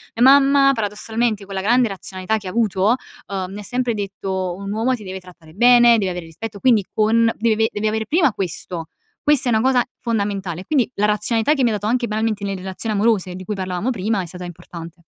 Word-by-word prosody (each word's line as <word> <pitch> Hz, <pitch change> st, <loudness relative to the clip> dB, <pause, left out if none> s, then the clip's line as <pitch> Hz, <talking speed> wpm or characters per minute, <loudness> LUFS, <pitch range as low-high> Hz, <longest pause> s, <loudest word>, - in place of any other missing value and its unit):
Mia 235 Hz, -, +2 dB
mamma, 275 Hz, 0 st, +6 dB
paradossalmente, 220 Hz, 0 st, -2 dB
con 195 Hz, -, -9 dB
la 190 Hz, -, -2 dB
grande 240 Hz, +4 st, +3 dB
razionalità 195 Hz, +2 st, -3 dB
che 200 Hz, -3 st, -8 dB
ha -, -, -2 dB
avuto, 215 Hz, +1 st, +2 dB, 0.3 s
uhm, 190 Hz, -2 st, -4 dB
mi 205 Hz, -, -7 dB
ha -, -, -8 dB
sempre 245 Hz, +2 st, -1 dB
detto: 190 Hz, -3 st, -3 dB
"Un 200 Hz, +1 st, -6 dB
uomo 230 Hz, +4 st, 0 dB
ti 215 Hz, -, -11 dB
deve 190 Hz, 0 st, -6 dB
trattare 175 Hz, -3 st, -16 dB
bene, 240 Hz, +2 st, +6 dB
deve 190 Hz, -3 st, -1 dB
avere 175 Hz, -1 st, -6 dB
rispetto", 200 Hz, +6 st, -8 dB
quindi 230 Hz, -4 st, +4 dB
con 225 Hz, +1 st, +3 dB
deve 225 Hz, 0 st, +2 dB
ave -, -, 0 dB
deve 210 Hz, +1 st, 0 dB
avere 220 Hz, +1 st, -2 dB
prima 315 Hz, -5 st, +3 dB
questo, 175 Hz, -3 st, -4 dB, 0.4 s
questa 285 Hz, -4 st, +3 dB
è -, -, +2 dB
una 220 Hz, -, +3 dB
cosa 255 Hz, -1 st, +3 dB, 0.2 s
fondamentale, 200 Hz, -6 st, -2 dB
quindi 275 Hz, -6 st, +1 dB
la 205 Hz, -, +1 dB
razionalità 220 Hz, +5 st, +1 dB
che 275 Hz, -4 st, 0 dB
mi 240 Hz, -, +4 dB
ha -, -, -1 dB
dato 210 Hz, 0 st, -3 dB
anche 240 Hz, +1 st, +1 dB
banalmente 215 Hz, -1 st, -1 dB
nelle 195 Hz, -, -2 dB
relazioni 190 Hz, +4 st, -4 dB
amorose 200 Hz, -4 st, +1 dB
di 185 Hz, -, -8 dB
cui 210 Hz, +2 st, -4 dB
parlavamo 185 Hz, +3 st, -3 dB
prima 215 Hz, -3 st, -1 dB
è -, -, -5 dB
stata 180 Hz, +1 st, -8 dB
importante. 170 Hz, -1 st, -10 dB
210 Hz, 220 wpm, -20 LUFS, 190-235 Hz, 0.4 s, mamma